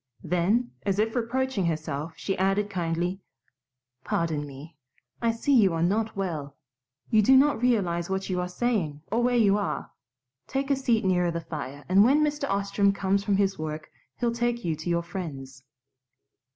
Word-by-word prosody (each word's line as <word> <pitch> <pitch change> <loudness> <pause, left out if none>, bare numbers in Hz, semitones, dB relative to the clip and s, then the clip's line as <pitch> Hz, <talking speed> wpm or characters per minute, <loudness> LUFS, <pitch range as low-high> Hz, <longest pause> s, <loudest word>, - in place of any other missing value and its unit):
Then, 180 +9 +1
as 195 -1 -1
if 220 +2 0
reproaching 245 -4 0
herself, 155 -1 -3
she 195 - -2
added 195 +2 +1
kindly, 175 +1 -2 0.8
"Pardon 155 -3 -1
me. 145 +4 -11 0.5
I 230 - +2
see 230 +5 0
you 200 -9 +5
are 165 - 0
not 215 +5 0
well. 155 -8 -4 0.6
You 220 -2 +5
do 265 +6 +6
not 280 -3 +3
realize 185 -9 +1
what 190 0 -2
you 180 -1 -1
are 180 - -2
saying 180 -8 -1
or 230 +3 +2
where 245 0 +2
you 205 -3 +4
are. 205 - -3 0.6
Take 275 +1 -2
a - - +4
seat 240 -6 +1
nearer 180 -2 +2
the 170 0 -2
fire, 145 -4 -7
and 195 +2 +6
when 280 +6 +4
Mr. 295 -2 -1
Ostrom 200 0 +2
comes 200 0 0
from 200 -1 +1
his 195 -2 +1
work 155 0 -5 0.3
he'll 235 -1 0
take 240 -1 -1
you 165 -2 0
to 155 +3 -5
your 170 0 +1
friends." 140 -8 -7
195 Hz, 175 wpm, -27 LUFS, 170-230 Hz, 0.8 s, do